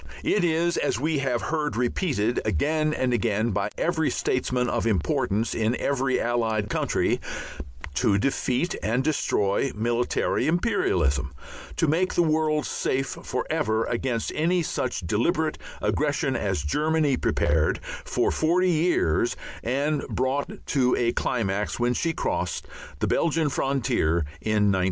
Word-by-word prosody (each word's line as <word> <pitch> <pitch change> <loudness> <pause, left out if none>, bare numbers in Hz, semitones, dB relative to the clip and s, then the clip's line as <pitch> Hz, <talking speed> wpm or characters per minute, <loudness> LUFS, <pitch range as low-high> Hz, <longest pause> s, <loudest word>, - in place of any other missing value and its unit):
It 205 - +2
is, 170 +1 +1 0.2
we 155 +1 0
have 125 -3 -1
heard 155 -2 -1
repeated 120 - 0
again 155 +1 +1
and 130 -4 0
again 115 -1 +1
by 100 0 -1
every 160 -2 +1
statesman 125 -1 0
of 115 - 0
importance 100 +3 0
in 110 +2 +1
every 135 -1 0
Allied 110 -3 0
country, - - +1 0.7
to 100 +8 +2
defeat 135 - 0
and 120 +4 0
destroy 135 -5 +1
military 120 +3 0
imperialism, 85 - +1 0.4
to - - +2
make 170 +5 +1
the 175 - +4
world 155 -1 +1
safe 135 +1 -1
for 125 - -3
ever 115 -8 +1
against 120 -1 -1
any 170 +3 +1
such 125 -8 -2
deliberate 85 - 0 0.2
aggression - - 0
as 75 - -1
Germany 150 - +1
prepared 80 -7 +1 0.2
for - - 0
forty 180 +3 +2
years 160 - +2 0.3
and 140 +4 0
brought 130 +2 -2
to 125 -3 +2
a 120 -1 +1
climax 105 -4 -1
when 120 0 +2
she 165 +6 0
crossed 90 - -2 0.3
the - - -1
Belgian 160 -2 +1
frontier 120 - +1 0.2
in 105 -2 +2
1914. 95 - +1
125 Hz, 130 wpm, -25 LUFS, 110-155 Hz, 0.7 s, the